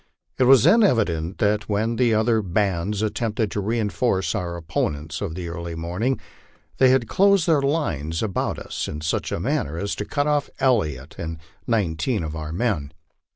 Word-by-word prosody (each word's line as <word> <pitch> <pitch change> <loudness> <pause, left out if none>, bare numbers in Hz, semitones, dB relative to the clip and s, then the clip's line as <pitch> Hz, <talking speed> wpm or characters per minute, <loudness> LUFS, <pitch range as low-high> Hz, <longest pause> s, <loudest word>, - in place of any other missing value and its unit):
It 130 - +5
was 130 -2 +7
then 230 - +6
evident 95 - +1
that 105 -1 +1
when 110 +3 0
the 125 -2 +3
other 110 +1 +2
bands 100 +1 0
at 110 - -1
tempted 110 -2 -1
to 105 - -2
reinforce 110 -1 0
our 90 -5 -3
opponents 80 -2 -3
of 90 -6 -3
the 90 -1 -5
early 85 0 -5
morning, 90 +11 -1 0.6
they 130 - +6
had 130 -3 +3
closed 200 - +4
their 155 -4 +4
lines 85 - -1
about 100 -4 -1
us - - -4
in 75 - -5
such 80 - -1
manner 75 +4 -1
as 100 +3 -2
to 105 - -3
cut 145 +5 -1
off 150 -1 +1
Elliott 80 - +1
and 80 -1 -4 0.3
nineteen 105 0 0
of 80 0 -5
our 80 -1 -5
men. 85 -6 -1
105 Hz, 175 wpm, -23 LUFS, 85-120 Hz, 0.6 s, was